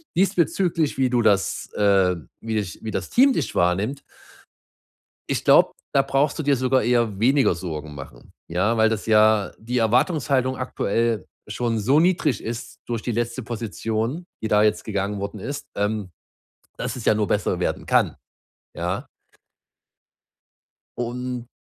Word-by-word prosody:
diesbezüglich, 175 -4 +1
wie 130 - +3
du 120 -1 +1
das, 100 -3 +1
ähm 95 -7 +2
wie 110 0 -3
dich 100 -4 -3
wie 110 - -4
das - - -3
Team 265 +2 +5
dich - - -2
wahrnimmt 100 +10 +1 1.3
ich - - -1
glaube, - - +6 0.2
da 140 - +4
brauchst 135 +3 0
du - - -1
dir 140 -2 +2
sogar 130 +1 +2
eher 115 -3 +1
weniger 130 -2 +4
Sorgen 80 -4 -6
machen, 65 -4 -11 0.2
ja? 95 +7 +1
Weil 110 0 +5
das 110 -2 -2
ja 110 -2 +4
die 120 +3 -4
Erwartungshaltung 130 - +2
aktuell 115 -3 -1 0.2
schon 115 +2 -1
so 130 +8 +3
niedrig 165 -7 +1
ist 115 +1 -6
durch 115 -2 -3
die 120 - -2
letzte 120 +3 -2
Position, 115 - -3 0.2
die 110 - -1
da 105 0 +4
jetzt 105 - +1
gegangen 100 -1 -2
worden 100 +2 -5
ist, 140 +8 -6
ähm, 105 -1 -1 0.7
dass - - -3
es 120 - -7
ja - - +5
nur 105 -1 0
besser 100 -3 0
werden - - -2
kann, - - +2 0.6
ja? - - -3 1.9
Und 125 0 -4
115 Hz, 150 wpm, -23 LUFS, 105-130 Hz, 1.9 s, glaube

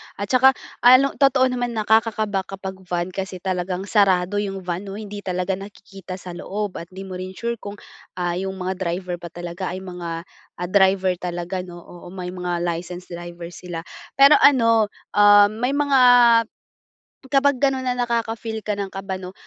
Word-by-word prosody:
At 200 - -5
saka 260 +1 +5 0.2
ano, 255 +3 +6
totoo 270 -2 +4
naman, 245 -1 -2
nakakakaba 215 -2 +1
kapag 190 -1 -7
van 175 +1 -2
kasi 195 +1 -5
talagang 185 0 -2
sarado 200 -1 +2
'yung 195 -2 -4
van 180 +2 -4
'no. 195 - -6
Hindi 205 -1 -7
talaga 185 0 -2
nakikita 195 -2 -10
sa 185 -1 -9
loob 200 +3 -5
at 170 - -9
'di 190 +2 -9
mo 185 -1 -7
rin 185 +1 -7
sure 235 +1 -3
kung, 205 -1 -8 0.4
ah, 175 -1 -1
'yung 190 +2 -3
mga 185 0 -4
driver 180 0 -3
ba 175 - -8
talaga 175 +2 -6
ay 190 - -7
mga, 170 -2 -6 0.3
ah, 180 - -4
driver 190 -1 +4
talaga 175 +1 -4
'no. 175 -1 -9
Oo, 175 - -13
may 180 0 -6
mga 180 -1 -3
licensed 175 +1 -5
driver 175 0 -8
sila 175 -2 -7 0.3
pero 275 +2 +7
ano, 230 -5 +5 0.2
ah, 205 0 +6
may 245 +6 -1
mga 285 -2 +3 1.3
kapag 280 0 +4
gano'n 265 -1 0
na 250 - 0
nakaka-feel 230 -2 -2
ka 210 0 -3
ng 200 -1 -4
kaba 195 0 -5
'no, 185 0 -8
190 Hz, 175 wpm, -22 LUFS, 180-220 Hz, 1.3 s, pero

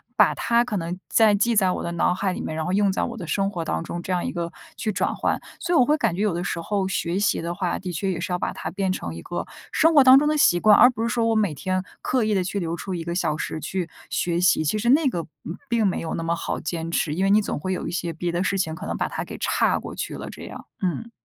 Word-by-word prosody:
把 - - +5
它 235 0 +2
可 215 -4 -3
能 175 +1 -4
在 220 -2 +5
记 230 +3 +2
在 190 -3 +4
我 - - -3
的 170 - -3
脑 170 +1 +2
海 190 +1 -1
里 - - -5
面， 155 - -4
然 160 - -2
后 180 - -2
用 200 0 +3
在 - - -1
我 235 - -4
的 185 - -6
生 195 +3 0
活 175 -4 -3
当 80 - -2
中， 170 - -5
这 185 - -4
样 180 - 0
一 - - -2
个 170 -1 -4 0.2
去 220 - -2
转 - - -1
换。 - - 0 0.2
所 345 0 0
以 - - +6
我 255 - +7
会 300 - +3
感 230 - 0
觉 190 - -2
有 210 - +2
的 175 +1 -2
时 170 - -2
候 195 +2 -1
学 180 -1 -1
习 205 - +2
的 170 +1 -3
话， 175 0 -2
的 185 -1 -5
确 190 +4 -1
也 175 - -3
是 185 - -4
要 - - +1
把 - - -1
它 - - -5
变 190 -1 -1
成 85 - -4
一 85 - -7
个 175 - -4 0.3
生 325 +1 +4
活 285 - +8
当 260 0 +9
中 295 - +1
的 305 - +2
习 175 -11 +4
惯。 210 +3 +6
而 250 - +8
不 230 - -6
是 230 - 0
说 235 -1 +1
我 225 - +2
每 205 -7 +2
天 185 +6 -1 0.2
刻 255 -2 +1
意 215 0 +1
地 190 - +2
去 195 +3 -2
留 170 -2 -2
出 190 +2 -5
1 170 - -4
个 170 +1 -3
小 165 -4 0
时 160 - -4
去 180 +1 -3 0.2
学 170 -1 0
习， 180 -3 +4
其 155 +7 0
实 235 +3 0
那 290 +3 +5
个， 175 -10 -1 0.2
嗯， 170 +5 -5
并 230 -2 +2
没 190 - +1
有 165 - -4
那 165 - -3
么 165 +1 0
好 - - -3
坚 165 +1 -4
持， 155 -2 0
因 185 - 0
为 195 - +3
你 210 +1 +5
总 200 - -3
会 185 +5 -2
有 - - -4
一 - - -3
些 170 0 -2
别 170 +2 -3
的 175 +2 0
事 195 +1 0
情 160 -3 -1
可 185 +4 -8
能 - - -2
把 - - 0
它 - - -4
给 - - -8
岔 - - +2
过 - - -8
去 - - -4
了 - - -7
这 - - -10
样， - - -9 0.2
嗯。 200 +5 -2
185 Hz, 335 characters per minute, -24 LUFS, 170-215 Hz, 0.3 s, 当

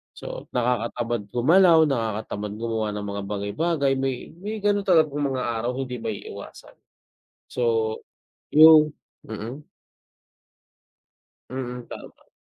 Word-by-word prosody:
So - - -8
nakakatamad 120 -2 -1
gumalaw, 165 +6 +5
nakakatamad 110 -4 -3
gumawa 110 -2 -2
ng 105 0 -4
mga 100 0 -4
bagay-bagay. 140 +9 -1
May 135 -2 -3
may 210 +3 -5
gano'n 205 -1 +2
talagang 155 -5 +3
mga 130 -1 -2 0.2
araw 120 +1 -1
hindi 125 -3 -4
maiiwasan. 110 -3 -8 0.7
So 115 -2 0 0.6
'yung 155 -1 +8 0.3
mm. 115 +7 -7 1.8
Mm, 125 -1 -6
tama. - - -12
125 Hz, 100 wpm, -24 LUFS, 110-150 Hz, 1.8 s, yung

